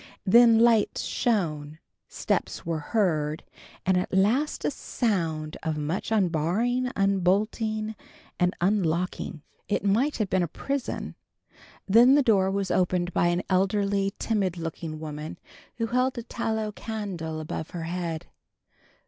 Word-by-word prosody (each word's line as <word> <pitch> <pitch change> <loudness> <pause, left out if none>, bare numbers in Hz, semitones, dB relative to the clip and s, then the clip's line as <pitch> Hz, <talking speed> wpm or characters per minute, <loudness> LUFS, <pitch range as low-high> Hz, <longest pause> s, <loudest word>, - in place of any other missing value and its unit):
Then 230 +3 +7
lights 230 -2 +3
shone, 155 - -1 0.3
steps - - -2
were 165 -1 -1
heard, 155 -4 0 0.4
and 185 0 +3
at 180 - -1
last 220 +11 +1
a - - +1
sound 165 - -2
of 160 -2 -2
much 155 +8 -3
unbarring, 215 +7 +1
unbolting, 210 +3 +1 0.5
and 180 0 +2
unlocking. 175 -4 -1 0.2
It 205 - -1
might 240 +9 +2
have 215 - 0
been 185 0 +1
a 175 - 0
prison. 275 - -4 0.7
Then 235 +7 +7
the 290 - +4
door 195 -5 +3
was 195 -1 -1
opened 180 -1 +1
by 175 - +3
an 175 +1 0
elderly, 195 +1 +1
timid 195 -6 -1
looking 165 -1 -5
woman, 155 0 -6 0.4
who 230 - 0
held 250 +2 0
a 235 - -4
tallow 220 -2 -2
candle 195 -8 -5
above 155 0 -5
her 170 -2 -5
head. 165 -1 -3
190 Hz, 130 wpm, -26 LUFS, 165-220 Hz, 0.7 s, Then